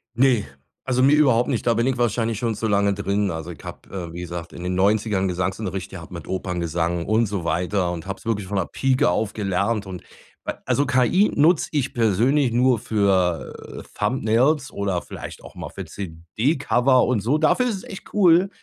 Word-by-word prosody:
Ne, 125 -3 +3 0.4
also 130 0 +1
mir 140 +2 +6
überhaupt 130 -4 +3
nicht, 120 -2 -1
da 115 - +4
bin 115 +2 +1
ich 130 -1 0
wahrscheinlich 115 -2 0
schon 115 -2 -1
zu 110 - -2
lange 100 -1 +2
drin. 100 0 0
Also 80 +1 -5
ich 80 - -12
habe, 90 -4 -7
wie 85 - -6
gesagt, 85 -1 -6
in 85 - -8
den 90 0 -2
90ern 100 0 +2
Gesangsunterricht 95 +2 -3
gehabt - - -9
mit - - -8
Operngesang 85 -2 -2
und 110 +2 +2
so 100 -4 -3
weiter 90 +3 0
und 85 0 -6
habe 95 -1 -4
es - - -19
wirklich 105 -4 -1
von 100 +1 -2
der 95 - +1
Pieke 130 -5 +1
auf 105 +4 -1
gelernt. 100 +1 -1
Und 90 -2 -8 0.4
weil - - -4
also 145 - +1
KI 135 - +3
nutze 160 +3 +3
ich 140 -4 -1
persönlich 120 +5 +2
nur 125 -1 +3
für, 95 -6 -1
äh, - - -22
Thumbnails 130 +6 +1
oder 100 -3 -2
vielleicht - - -9
auch - - -12
mal - - -7
für - - -7
CD-Cover 120 - +1
und 125 -3 +1
so. 125 +9 +1
Dafür 250 +11 +2
ist 225 - -1
es 190 - -8
echt 195 +2 -10
cool. 185 -1 +5
105 Hz, 195 wpm, -23 LUFS, 95-130 Hz, 0.4 s, mir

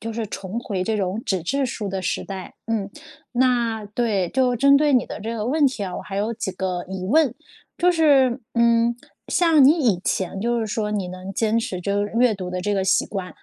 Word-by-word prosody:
就 225 +1 -5
是 225 -1 -3
重 195 +3 -5
回 190 -6 -3
这 220 +1 0
种 195 +2 -2
纸 190 -4 -1
质 275 +9 0
书 215 -4 -4
的 190 -1 -3
时 185 - -2
代。 190 -2 -7
嗯， 215 -3 -2 0.4
那 240 -4 +1
对， 205 -4 0
就 250 +1 +1
针 280 +3 +5
对 295 0 +3
你 250 - +3
的 - - -7
这 225 +2 -4
个 215 +1 -3
问 290 +2 +3
题 255 -6 -2
啊， 180 - -5
我 - - -6
还 195 - -7
有 215 +3 -1
几 215 -3 -3
个 180 -1 -3
疑 190 -1 -5
问， 280 0 +3 0.4
就 360 +1 +4
是， 275 -6 +3
嗯， 235 0 +3 0.3
像 325 -6 +4
你 280 - +8
以 225 - +2
前 190 0 -1
就 235 +1 0
是 220 - -2
说 210 0 -2
你 200 -4 -2
能 185 +2 -7
坚 225 +2 +1
持 185 -5 -3
就 200 +2 0
是 205 - -7
阅 245 -3 +4
读 185 -2 -6
的 180 0 -3
这 205 +2 -1
个 190 -1 0
习 190 - +2
惯， 190 -3 -5
220 Hz, 245 characters per minute, -22 LUFS, 195-245 Hz, 0.4 s, 你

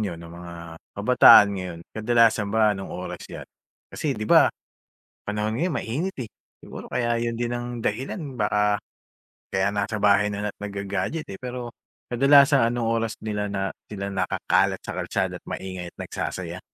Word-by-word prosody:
niyo 95 -6 -2
ng 85 0 -11
mga 85 0 -9 0.4
kabataan 105 -1 +8
ngayon, 90 -3 -5
kadalasan 115 -1 +3
ba 110 0 +3
anong 95 -1 -6
oras 90 - -6
'yan? - - -8 0.5
Kasi, 140 -6 -2
'di 110 - -3
ba, - - +6 0.8
panahon 105 +2 -2
ngayon 175 +2 0
mainit, 160 +12 -3
eh. 115 - -6 0.3
Siguro - - -9
kaya 120 -1 0
yun 115 0 -1
din 120 0 -1
ang 120 0 -3
dahilan 130 - -3
baka 105 -1 +2 0.7
kaya 95 0 +1
nasa 105 +1 -1
bahay 105 0 +4
na 105 0 -3
lang - - -3
at - - -58
nagga-gadget, 100 +10 -3
eh, 95 - -8
pero 125 -1 -5 0.4
kadalasan 140 +2 +5
anong 120 -2 -1
oras 115 -1 -1
nila 105 -1 -2
na 95 -1 -2 0.2
nila 100 -1 -4 0.2
nakakalat - - +1
sa - - -6
kalsada - - -2
maingay 95 -2 -6
at - - -59
nagsasaya? - - -5
105 Hz, 160 wpm, -24 LUFS, 100-120 Hz, 0.8 s, kabataan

